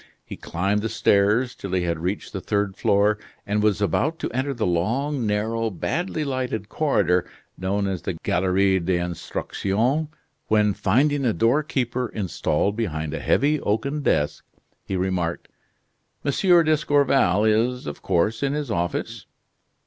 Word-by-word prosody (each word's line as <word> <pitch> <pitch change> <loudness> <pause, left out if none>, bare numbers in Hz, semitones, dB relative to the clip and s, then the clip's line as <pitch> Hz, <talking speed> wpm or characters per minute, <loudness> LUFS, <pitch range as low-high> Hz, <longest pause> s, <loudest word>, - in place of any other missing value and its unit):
He - - -7
climbed 100 +5 -1
the 115 - -2
stairs 110 +3 +2
till 95 -2 -7
he 90 -1 +1
had 85 -2 -1
reached 90 +5 -3
the 95 - -4
third 100 -1 -1
floor, 105 +1 +2 0.3
and 105 0 0
was 105 -1 +2
about 155 +10 0
to - - -4
enter 130 +3 -1
the 120 -5 -2
long, 115 - 0
narrow, 110 +2 0
badly 155 - -2
lighted 125 -6 -3
corridor 90 - +2 0.3
known 100 +2 -1
as 95 -4 -2
the 90 - -3
Galerie 95 +3 +1
de 90 +1 0
l'Instruction, 100 - -1 0.4
when, 105 -1 +3
finding 135 +10 +2
a 120 -4 +2
doorkeeper 125 - 0
installed 100 -1 -1
behind 80 -9 -3
a - - -3
heavy 150 +2 +2
oaken 135 +8 -1
desk, 75 - 0 0.4
he 95 - -4
remarked: 90 -2 -2 0.8
"M. 140 - +2
d'Escorval 145 - +3
is, 115 +4 +1
of - - -6
course, 95 +4 +1
in 140 0 0
his 145 -5 -3
office?" 85 -1 -3
105 Hz, 145 wpm, -23 LUFS, 95-130 Hz, 0.8 s, when